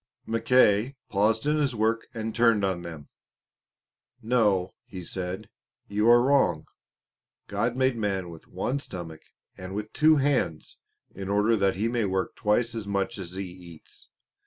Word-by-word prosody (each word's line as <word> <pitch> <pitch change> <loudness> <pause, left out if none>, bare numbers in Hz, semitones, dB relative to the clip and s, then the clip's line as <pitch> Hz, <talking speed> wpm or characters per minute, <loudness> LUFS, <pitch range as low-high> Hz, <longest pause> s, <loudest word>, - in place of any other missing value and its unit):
Mackay 115 +1 +3
paused 110 +2 +1
in 150 +1 +2
his 140 -5 0
work 110 +1 0
and 110 -2 -4
turned 115 -3 +3
on 95 -2 -1
them. 80 -4 -9 1.1
"No," 105 -6 +1
he 95 -2 -9
said, 90 +1 -5 0.4
"you 105 +3 +2
are 120 0 +7
wrong. 140 +1 +2 0.8
God 120 +1 -1
made 130 -1 +2
man 95 -5 -2
with 80 - -13
one 135 +3 -2
stomach 85 - -8 0.4
and 90 +1 -7
with 105 +1 -5
two 155 0 +5
hands 135 - 0 0.3
in 95 0 -6
order 105 +3 +3
that 100 -3 +1
he 105 +4 0
may 115 -2 0
work 95 -1 -2
twice 115 +3 +1
as 110 -3 -5
much 100 0 -2
as 90 -2 -7
he 95 +1 -4
eats." 90 -3 -13
105 Hz, 155 wpm, -27 LUFS, 95-120 Hz, 1.1 s, are